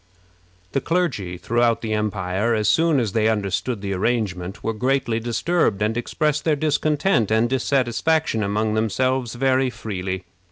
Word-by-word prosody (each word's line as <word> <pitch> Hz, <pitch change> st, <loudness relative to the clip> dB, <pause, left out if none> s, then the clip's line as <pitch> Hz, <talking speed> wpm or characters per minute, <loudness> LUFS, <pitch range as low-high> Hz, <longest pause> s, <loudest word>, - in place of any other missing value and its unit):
The 135 Hz, -, 0 dB
clergy 135 Hz, -, -1 dB
throughout 120 Hz, +5 st, +1 dB
the 110 Hz, -1 st, -1 dB
empire, 105 Hz, +1 st, 0 dB
as 110 Hz, -1 st, 0 dB
soon 165 Hz, -3 st, +3 dB
as 115 Hz, -5 st, -1 dB
they 110 Hz, +1 st, +2 dB
understood 105 Hz, +1 st, -1 dB
this 100 Hz, -1 st, -2 dB
arrangement, 95 Hz, -3 st, -2 dB
were 115 Hz, -, -1 dB
greatly 125 Hz, 0 st, 0 dB
disturbed, 120 Hz, -, 0 dB
and 110 Hz, +1 st, 0 dB
expressed 150 Hz, +5 st, -1 dB
their 155 Hz, -2 st, +2 dB
discontent 150 Hz, -, +1 dB
and 110 Hz, +2 st, +3 dB
dissatisfaction 130 Hz, +1 st, +1 dB
among 105 Hz, +2 st, 0 dB
themselves 120 Hz, +3 st, 0 dB
very 130 Hz, +1 st, +2 dB
freely. 95 Hz, -6 st, -4 dB
115 Hz, 145 wpm, -22 LUFS, 105-135 Hz, -, soon